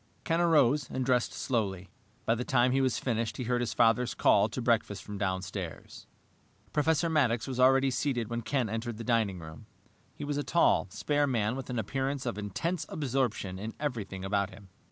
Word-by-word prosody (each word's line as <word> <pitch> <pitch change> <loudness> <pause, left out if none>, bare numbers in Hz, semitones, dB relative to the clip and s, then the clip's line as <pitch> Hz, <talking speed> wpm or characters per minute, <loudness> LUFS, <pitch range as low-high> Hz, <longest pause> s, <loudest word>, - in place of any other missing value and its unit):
Ken 165 +1 +1
arose 150 -5 +3
and 130 -1 -2
dressed 125 -2 +2
slowly. 105 -8 -2 0.4
By 115 - +3
the 120 +2 -2
time 125 -1 +3
he 135 +1 +2
was 130 -2 +1
finished 115 -3 -2
he 125 - -3
heard 120 +1 0
his 120 - -2
father's 120 +1 +3
call - - +4
to - - -5
breakfast - - 0
from 105 -1 -7
downstairs. 95 -2 -4 0.7
Professor 160 +2 +2
Maddox 130 -8 +2
was 130 -2 -4
already 135 +1 +5
seated 130 -3 -1
when 120 +1 -3
Ken 130 0 0
entered 115 +1 -4
the 115 - -6
dining 110 -5 +1
room. 80 -3 -10 0.5
He - - -7
was 145 0 -2
a 145 - -1
tall, 170 -10 +3
spare 145 +9 0
man 115 -3 0
with 135 -1 -6
an 125 - -3
appearance 135 +3 -2
of 115 -4 -3
intense 150 - -3
absorption 125 - -1
in 110 +3 -6
everything 105 -10 -4
about 100 0 0
him. 95 0 -14
120 Hz, 190 wpm, -30 LUFS, 105-135 Hz, 0.7 s, already